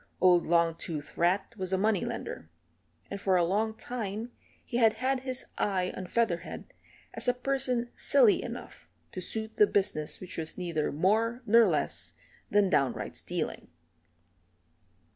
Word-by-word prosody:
Old 180 -2 +5
Longtooth 165 -2 0
Rat 185 +5 +1
was 185 -1 -4
a 190 - +2
money 210 -1 +2
lender, 80 - -5 0.6
and 200 0 -5
for 190 -2 +2
a 175 - +3
long 215 +5 0
time 225 -1 -5 0.3
he 240 - -3
had 225 -3 +5
had 260 +3 0
his 255 0 -4
eye 185 -3 0
on 185 - -6
Featherhead 180 -6 -2 0.4
as - - -3
a 245 - +3
person 250 -2 -1
silly 455 -5 +4
enough - - -8 0.2
to 185 - -5
suit 220 +4 -4
the 210 - +6
business 165 -8 0
which 185 -2 -6
was 160 -1 -3
neither 170 -4 -1
more 220 - +1
nor 230 0 +6
less - - -1 0.3
than 205 -1 +4
downright 135 -9 0
stealing. - - -4
200 Hz, 145 wpm, -29 LUFS, 175-235 Hz, 0.6 s, the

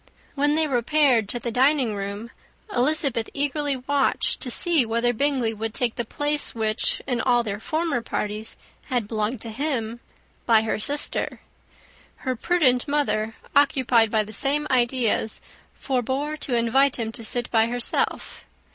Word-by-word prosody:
When 290 +1 +1
they 315 0 +3
repaired 255 -4 +2
to - - 0
the 235 - -4
dining 260 -1 +2
room, 200 +3 -5 0.4
Elizabeth 270 -4 +1
eagerly 290 -1 0
watched 275 +2 0
to 255 - -4
see 330 +3 +4
whether 235 +2 0
Bingley 255 -3 0
would 220 +1 -5
take 240 -2 0
the 240 - -3
place 290 +5 -1
which, 220 -1 0
in 245 -3 -1
all 245 -2 +2
their 205 -2 -4
former 315 +1 -1
parties, 215 -1 -3 0.3
had 245 -6 -2
belonged 215 +2 -2
to 230 - -5
him, 235 -3 -2 0.5
by 225 -2 +5
her 220 - -2
sister. 285 +7 -1 0.9
Her 255 -1 0
prudent 260 -3 +2
mother, 225 -7 0 0.2
occupied 260 -5 +4
by 215 0 +1
the 215 +1 -10
same 285 +5 0
ideas, 240 -3 +1 0.4
forbore 270 +3 -2
to 265 -4 -2
invite 250 +4 +3
him 225 -2 -3
to 230 - -7
sit 240 +2 -1
by 225 0 +3
herself. 245 0 -1
245 Hz, 150 wpm, -24 LUFS, 225-280 Hz, 0.9 s, by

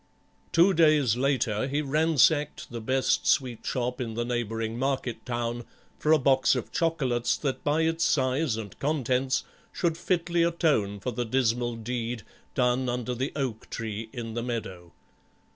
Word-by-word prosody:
Two 175 +4 +5
days 155 - +4
later 130 -3 0
he 145 +2 -1
ransacked 150 0 +2
the 120 -1 -5
best 130 +4 +1
sweet 125 -4 +1
shop 125 0 -2
in 115 -3 -4
the 120 +1 -1
neighbouring 115 -1 -2
market 130 -4 -2
town 120 0 -2 0.4
for 155 - +1
a 160 - +7
box 135 -1 +3
of - - -4
chocolates 135 -8 0
that 135 -3 -3
by 150 +2 +2
its 165 +1 +1
size 130 -3 +1
and 105 -3 -8
contents 130 -3 0 0.3
should 170 -2 -1
fitly 175 -1 0
atone 150 -12 +1
for 125 - -3
the 120 +1 -2
dismal 120 -1 0
deed 115 0 -4 0.3
done 125 0 +2
under 125 0 -2
the 130 +4 -2
oak 130 -7 -3
tree 110 -1 -5
in 115 -2 -6
the 120 - -2
meadow. 95 -8 -5
125 Hz, 155 wpm, -27 LUFS, 115-145 Hz, 0.4 s, a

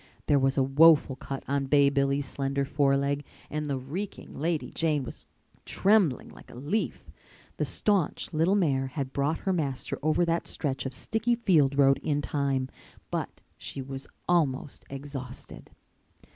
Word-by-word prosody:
There 145 -1 +4
was 135 +1 +1
a 135 - +4
woeful 145 0 +5
cut 135 +1 -6
on 140 0 0
Bay 140 0 +5
Billy's 140 0 +1
slender 140 0 -1
foreleg 140 0 +1 0.3
and 150 0 -2
the 140 -2 -1
reeking 160 +11 -6
Lady 160 +1 -1
Jane 155 -4 0
was - - -9 0.4
trembling 195 - +2
like - - -15
a - - -12
leaf. 150 - -3 0.5
The - - 0
staunch 200 -7 0
little 165 +5 +3
mare 140 -9 +1
had 130 0 -4
brought 145 +3 0
her 190 - 0
master 140 -7 -2
over 155 +4 +2
that 170 0 -1
stretch 135 -3 -2
of 130 - -7
sticky 225 - 0
field 155 - +3
road 135 -1 +5
in 145 -1 -1
time, 135 -3 0 0.4
but - - -4 0.2
she - - -5
was 135 0 -6 0.2
almost 145 -6 0
exhausted. 135 -2 -8
140 Hz, 155 wpm, -28 LUFS, 135-160 Hz, 0.5 s, woeful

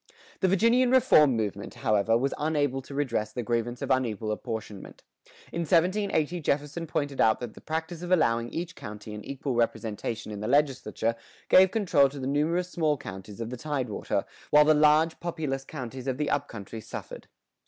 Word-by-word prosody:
The 190 - +2
Virginian 230 +7 +4
reform 155 - +5
movement, 100 -2 -3
however, 110 -2 +2
was 135 +3 0
unable 145 -3 0
to 140 +2 -10
redress 115 -7 -1
the 120 +2 -4
grievance 120 +1 -2
of - - -2
unequal 115 -4 0
apportionment. 110 -2 -6 0.5
In 170 - -4
1780 175 0 +1
Jefferson 150 +2 -2
pointed 145 -3 -1
out 110 -1 +4
that 120 -3 -6
the - - -14
practice 160 +1 -4
of 180 0 -5
allowing 115 -9 +2
each 175 +4 -5
county 105 0 -8
an 105 0 -7
equal 140 -1 -4
representation 115 -1 -2
in 105 - -6
the 105 - -4
legislature 135 -4 +1 0.3
gave 190 0 +7
control 180 -10 +3
to 140 +1 -9
the 130 - -4
numerous 165 +6 0
small 155 -4 +1
counties 95 0 -9
of 115 0 -4
the 125 - -5
tidewater, 130 -5 -2 0.2
while 150 0 +6
the 155 - +6
large 155 +2 +4
populous 155 -6 -3
counties 130 -2 -7
of 130 -1 -1
the 150 - -1
up 145 - 0
country 110 0 -8
suffered. - - -8
140 Hz, 175 wpm, -27 LUFS, 115-160 Hz, 0.5 s, gave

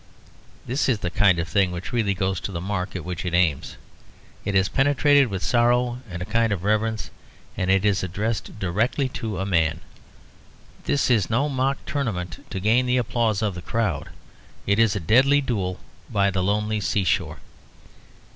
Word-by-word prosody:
This 130 +3 0
is 125 - +2
the 90 - -2
kind 95 -2 +4
of 85 +1 -2
thing 100 -1 +2
which 90 +7 -6
really 105 -5 +1
goes 95 0 -1
to - - -5
the 85 - -4
mark 95 +1 -3
at 90 - -5
which 90 -2 -4
it 85 -1 -1
aims. 85 -6 +1 0.7
It 100 - -2
is 95 0 +4
penetrated 145 0 +3
with 95 -4 -4
sorrow 120 0 +2
and 90 0 -5
a - - -6
kind 115 +1 +1
of 95 -4 -2
reverence, 110 +1 0 0.4
and 95 - -2
it 95 +1 +3
is 100 -2 +2
addressed 105 +5 -3
directly 105 +8 0
to 110 -5 -5
a 95 - -2
man. 85 -3 +1 1.1
This 140 -2 +1
is 105 -7 +2
no 130 +6 +1
mock 135 -1 0
tournament 105 - -3
to 95 - -4
gain 115 +6 +2
the 125 +1 +2
applause 115 -2 0
of 105 -3 0
the 90 - -7
crowd. 100 -8 -2 0.6
It 100 +2 +2
is 110 -3 +4
a - - -1
deadly 130 - +4
duel 100 -9 -2 0.3
by 100 -1 +2
the 95 -1 -1
lonely 105 +3 0
seashore. 95 0 0
105 Hz, 180 wpm, -24 LUFS, 95-120 Hz, 1.1 s, kind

